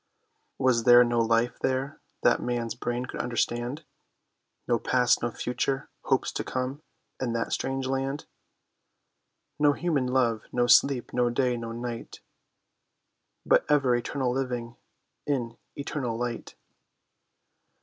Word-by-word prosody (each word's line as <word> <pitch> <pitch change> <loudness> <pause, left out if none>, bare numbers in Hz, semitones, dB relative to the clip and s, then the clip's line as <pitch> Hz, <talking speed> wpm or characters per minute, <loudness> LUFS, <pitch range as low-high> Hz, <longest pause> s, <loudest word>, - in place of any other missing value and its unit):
Was 125 -3 +2
there 120 0 +9
no 120 -1 +1
life 115 +1 +1
there 130 +3 -2 0.2
that - - +4
man's 120 -2 -2
brain 120 +1 -3
could - - -7
understand? 120 +4 -1 0.8
No 120 -1 +2
past, 125 -2 +2
no 120 - 0
future, 125 +4 -2 0.2
hopes 135 -2 +1
to - - -3
come, 130 +3 -3 0.4
in 120 -3 -1
that 115 0 -1
strange 135 0 -2
land? 135 +2 -2 1.3
No 145 -1 +5
human 150 -6 0
love, 120 -4 +1
no 120 -1 +2
sleep, 130 +1 +4
no 125 -1 +2
day, 125 0 +1
no 115 -1 -5
night, 120 0 -6 1.3
But - - +4
ever 140 -4 +4
eternal 125 +1 -1
living 125 -2 -3 0.5
in 120 -5 -1 0.2
eternal 135 -5 -3
light? 120 -1 -4
125 Hz, 125 wpm, -27 LUFS, 120-135 Hz, 1.3 s, there